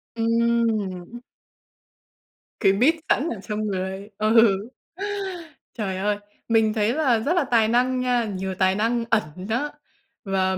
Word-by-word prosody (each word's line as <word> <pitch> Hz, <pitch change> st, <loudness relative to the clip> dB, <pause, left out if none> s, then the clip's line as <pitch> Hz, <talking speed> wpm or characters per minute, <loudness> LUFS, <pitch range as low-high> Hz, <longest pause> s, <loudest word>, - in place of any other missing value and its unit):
Ừm, 230 Hz, 0 st, +2 dB
ưm. 190 Hz, +4 st, -7 dB, 1.4 s
Cái 195 Hz, -, +4 dB
beat 255 Hz, +11 st, +4 dB, 0.2 s
sẵn 305 Hz, +5 st, +2 dB
ở 220 Hz, -, -5 dB
trong 210 Hz, +2 st, -3 dB
người. 190 Hz, +1 st, -4 dB
Ừ. 215 Hz, -2 st, +5 dB, 1.2 s
Trời 195 Hz, -5 st, -3 dB
ơi! 205 Hz, +1 st, 0 dB, 0.3 s
Mình 220 Hz, -2 st, +3 dB
thấy 220 Hz, +1 st, +1 dB
là 265 Hz, -7 st, +2 dB
rất 285 Hz, +10 st, 0 dB
là 345 Hz, -, +3 dB
tài 230 Hz, -4 st, +3 dB
năng 250 Hz, +2 st, +2 dB
nha, 245 Hz, -2 st, +1 dB
nhiều 190 Hz, -2 st, -4 dB
tài 190 Hz, 0 st, +3 dB
năng 230 Hz, +2 st, 0 dB
ẩn 225 Hz, -2 st, +4 dB, 0.3 s
đó 285 Hz, +6 st, -1 dB, 0.5 s
và 190 Hz, -1 st, 0 dB
220 Hz, 140 wpm, -24 LUFS, 195-235 Hz, 1.4 s, Ừ